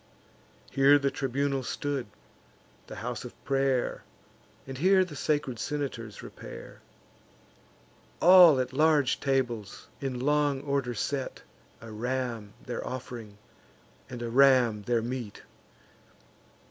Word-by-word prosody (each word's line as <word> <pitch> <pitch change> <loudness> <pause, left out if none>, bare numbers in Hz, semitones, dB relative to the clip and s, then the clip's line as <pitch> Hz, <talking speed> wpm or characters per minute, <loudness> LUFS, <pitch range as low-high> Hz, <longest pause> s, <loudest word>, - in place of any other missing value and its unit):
Here 140 +1 +6
the 140 -1 0
tribunal 135 0 -1
stood, 135 -1 -3 0.8
the - - -8
house - - -4
of - - -10
pray'r, 135 -2 0 0.6
And 135 -1 -7
here 185 +3 +4
the 160 -5 -10
sacred 145 -5 -1
senators 130 -7 -4
repair; - - -11 1.4
All 175 -5 +8
at 130 0 -2
large 150 -2 +3
tables, 120 -7 -2
in 130 -3 -3
long 145 0 +1
order 140 -4 -2
set, 135 +4 -3 0.4
A 115 - -10
ram 115 -2 -3
their 125 - -4
off'ring, 120 -5 -7 0.7
and 120 -1 -6
a 120 - -3
ram 125 -4 +4
their 120 -2 +1
meat. 120 -3 -6
130 Hz, 110 wpm, -28 LUFS, 120-145 Hz, 1.4 s, All